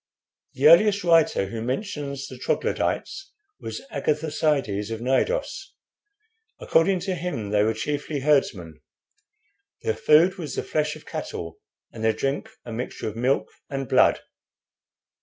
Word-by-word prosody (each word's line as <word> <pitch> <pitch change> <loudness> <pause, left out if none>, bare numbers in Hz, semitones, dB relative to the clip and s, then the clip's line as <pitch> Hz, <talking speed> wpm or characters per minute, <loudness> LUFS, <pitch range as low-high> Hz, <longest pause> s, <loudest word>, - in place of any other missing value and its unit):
"The 140 +3 +4
earliest 200 +5 +6
writer 165 - +4
who 110 +3 -6
mentions 140 - -4
the 130 -1 -10
Troglodytes 390 - -2 0.3
was - - -6
Agatharcides, 150 -9 0
of 115 -1 -4
Cnidos. 390 - -1 0.9
According 180 +3 +2
to 190 +1 -2
him 165 - -4
they 105 -1 +3
were 110 +1 +1
chiefly 145 +4 -3
herdsmen. 110 - 0 1.0
Their 450 - +1
food 175 +5 +4
was 155 -5 -5
the - - -2
flesh 150 -1 -1
of - - -14
cattle, 85 -1 -6 0.3
and 110 - -7
their 110 0 +3
drink 135 +6 -2 0.2
a 120 - -7
mixture 120 -1 -4
of 105 - -10
milk 125 +4 0 0.2
and 135 -2 -4
blood. - - +4
140 Hz, 135 wpm, -24 LUFS, 115-165 Hz, 1.0 s, earliest